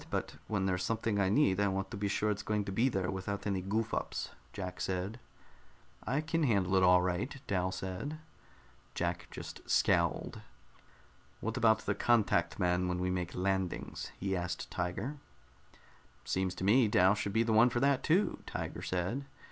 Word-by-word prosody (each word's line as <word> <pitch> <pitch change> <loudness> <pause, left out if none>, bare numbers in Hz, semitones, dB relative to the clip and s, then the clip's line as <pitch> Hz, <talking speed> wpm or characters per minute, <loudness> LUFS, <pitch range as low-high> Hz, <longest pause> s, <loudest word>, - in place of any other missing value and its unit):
But - - -3
when 100 -3 0
there's 90 -1 0
something 110 -1 0
I 95 -1 +3
need, 100 -4 +3
I 100 - +3
want 95 0 -2
to - - -4
be 100 0 -1
sure 105 +1 +1
it's 105 0 -2
going 105 -1 -1
to 100 - -4
be 115 +7 +2
there 95 -6 -1
without 95 +1 -4
any 100 -2 0
goof 110 +4 -1
ups," - - -2 0.2
Jack 90 -2 -6
said. 95 +5 -2 0.9
"I 135 +4 +1
can 165 +1 -1
handle 100 - +2
it 95 - +5
all 90 0 +6
right," 95 +10 -2
Dal 95 -2 0
said. 95 +11 -4 0.8
Jack 85 0 -2
just - - -8
scowled. - - +2 1.0
"What 110 +1 -3
about 110 -3 +4
the 100 - +1
contact 100 -6 +2
man 90 -1 +1
when 90 0 -1
we 90 0 0
make 90 -2 -3
landings?" 95 -1 -2
he 95 0 -1
asked 90 -1 -4
Tiger. 95 +11 -3 1.1
"Seems 95 0 -1
to - - -5
me 110 +5 +5
Dal 95 -1 +5
would 100 - -2
be 110 +3 +3
the 115 -1 +1
one 115 +3 +6
for 120 - -1
that, 140 0 +3
too," 185 +6 +2
Tiger - - -4
said. 95 +10 -2
95 Hz, 180 wpm, -32 LUFS, 90-115 Hz, 1.1 s, all